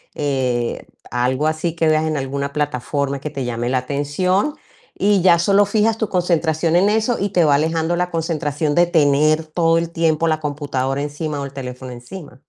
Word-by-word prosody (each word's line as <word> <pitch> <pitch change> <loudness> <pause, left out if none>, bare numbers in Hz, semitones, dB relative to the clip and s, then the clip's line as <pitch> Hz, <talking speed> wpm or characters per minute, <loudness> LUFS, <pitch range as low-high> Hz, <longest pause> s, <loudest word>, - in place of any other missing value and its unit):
eh, 130 -5 -1 0.3
algo 130 +4 0
así 155 +1 -1
que 165 -1 +1
veas 155 0 +2
en 155 -1 -1
alguna 140 +1 -3
plataforma 140 -1 -2
que 150 - -5
te 135 -3 -4
llame 120 0 -2
la 130 0 +1
atención 145 - -1 0.4
y 200 -2 +2
ya 170 -2 +5
solo 200 +3 +4
fijas 215 +2 +1
tu 220 -2 -2
concentración 170 -2 +1
en 190 +4 +4
eso 220 +3 +1
y 200 - -1
te 175 -3 +3
va 145 -2 +4
alejando 160 +3 0
la 180 0 -1
concentración 155 -2 -1
de 175 - +5
tener 155 -1 +3
todo 165 +1 +2
el 165 0 -3
tiempo 165 -1 +1
la 155 -1 +1
computadora 140 -2 -2
encima 145 +1 -4
o - - -3
el 140 - -9
teléfono 125 -1 -7
encima. 125 +3 -10
155 Hz, 185 wpm, -19 LUFS, 140-170 Hz, 0.4 s, ya